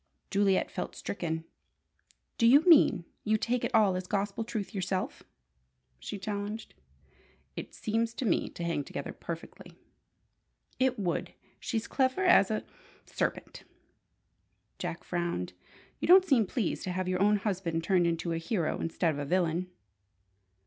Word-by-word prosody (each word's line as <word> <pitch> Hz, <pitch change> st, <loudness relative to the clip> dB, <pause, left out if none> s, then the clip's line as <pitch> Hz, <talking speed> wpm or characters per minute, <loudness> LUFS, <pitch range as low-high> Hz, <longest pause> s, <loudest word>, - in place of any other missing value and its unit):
Juliet 195 Hz, -1 st, +2 dB
felt -, -, -5 dB
stricken. 160 Hz, -4 st, -3 dB, 1.0 s
"Do 230 Hz, -, +5 dB
you 275 Hz, +5 st, +8 dB
mean 310 Hz, -, +6 dB, 0.2 s
you 215 Hz, 0 st, +2 dB
take 240 Hz, +3 st, -1 dB
it -, -, 0 dB
all 205 Hz, -4 st, +5 dB
as 185 Hz, 0 st, -4 dB
gospel 200 Hz, +2 st, -1 dB
truth 220 Hz, -2 st, -4 dB
yourself?" 185 Hz, -1 st, -2 dB, 0.8 s
she 205 Hz, -, -6 dB
challenged. 205 Hz, +2 st, -5 dB, 0.8 s
"It -, -, -7 dB
seems 230 Hz, +2 st, -1 dB
to 260 Hz, -, -3 dB
me 195 Hz, -, +1 dB
to 170 Hz, -, -7 dB
hang 170 Hz, -4 st, -1 dB
together -, -, -6 dB
perfectly." -, -, -8 dB, 1.0 s
"It 260 Hz, -1 st, +2 dB
would! 180 Hz, -5 st, -2 dB, 0.2 s
She's 225 Hz, -2 st, -2 dB
clever 265 Hz, +8 st, +1 dB
as 360 Hz, -, +6 dB
a 215 Hz, -, -1 dB, 0.4 s
serpent." -, -, -3 dB, 1.2 s
Jack 165 Hz, -, -4 dB
frowned. 170 Hz, -, -2 dB, 0.5 s
"You -, -, -2 dB
don't 370 Hz, +2 st, +8 dB
seem 255 Hz, -, +3 dB
pleased 215 Hz, -1 st, -1 dB
to 185 Hz, -, -2 dB
have 185 Hz, 0 st, -2 dB
your 185 Hz, 0 st, 0 dB
own 210 Hz, +1 st, +5 dB
husband 185 Hz, -5 st, -2 dB
turned 180 Hz, -1 st, +3 dB
into 170 Hz, 0 st, -1 dB
a 165 Hz, -, -1 dB
hero 165 Hz, -1 st, -1 dB
instead 165 Hz, 0 st, 0 dB
of 145 Hz, -, -5 dB
a 145 Hz, -, -2 dB
villain." 175 Hz, +2 st, 0 dB
195 Hz, 145 wpm, -30 LUFS, 175-225 Hz, 1.2 s, you